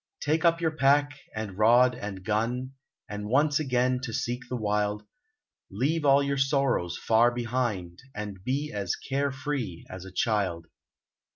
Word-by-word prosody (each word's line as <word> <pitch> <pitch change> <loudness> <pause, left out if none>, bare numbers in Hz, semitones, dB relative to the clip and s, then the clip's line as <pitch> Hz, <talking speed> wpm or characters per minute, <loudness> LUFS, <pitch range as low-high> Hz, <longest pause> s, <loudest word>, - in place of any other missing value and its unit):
Take 155 +1 0
up 170 -1 +4
your 165 -2 +1
pack 145 -1 +3 0.2
and 105 -3 -5
rod 120 +3 +6
and 100 -6 -6
gun, 120 +4 -1 0.4
And 105 0 -5
once 145 +4 +3
again 125 -3 +1
to 125 -2 -5
seek 120 +2 -2
the 125 - -2
wild, 105 -2 -1 0.7
Leave 145 +10 0
all 140 0 +5
your 140 -1 -1
sorrows 135 - +1
far 115 +2 +4
behind, 120 -8 -2 0.2
And 105 -3 -6
be 140 +5 -1
as 100 -3 -1
carefree 135 - -3
as 95 0 -7
a 95 - -10
child. 95 -5 0
120 Hz, 150 wpm, -27 LUFS, 105-140 Hz, 0.7 s, rod